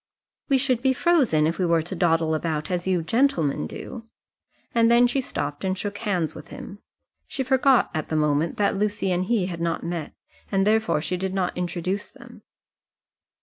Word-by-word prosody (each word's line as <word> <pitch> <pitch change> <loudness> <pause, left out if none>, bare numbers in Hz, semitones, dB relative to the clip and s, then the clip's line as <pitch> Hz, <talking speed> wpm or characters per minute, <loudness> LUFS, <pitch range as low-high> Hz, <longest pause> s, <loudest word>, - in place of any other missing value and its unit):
"We 275 - +4
should 255 -3 +1
be 265 0 +3
frozen 260 - +3
if 165 +4 -1
we 185 - +2
were 165 -1 +2
to 175 +4 -6
dawdle 165 -2 +2
about 155 0 -2
as 180 0 -2
you 180 -3 +1
gentlemen 165 - +1
do," 225 - -8 0.7
and 230 -1 +4
then 235 +1 +6
she 245 +3 +1
stopped 145 - -4
and 190 0 -1
shook 205 +1 -4
hands 180 -8 -1
with 155 +1 -11
him. 200 - -9 0.5
She 265 - -3
forgot 265 0 +3
at 155 -2 -3
the 160 - -1
moment 150 +1 +1
that 205 -1 +2
Lucy 205 -1 0
and 180 +1 0
he 210 -3 +1
had 170 -2 -5
not 170 -1 -1
met, 170 -2 -4 0.4
and 195 -1 +2
therefore 220 -6 +2
she 175 +4 -2
did 190 +1 -3
not 185 -2 -1
introduce 180 +3 -3
them. - - -15
185 Hz, 190 wpm, -24 LUFS, 165-225 Hz, 0.7 s, then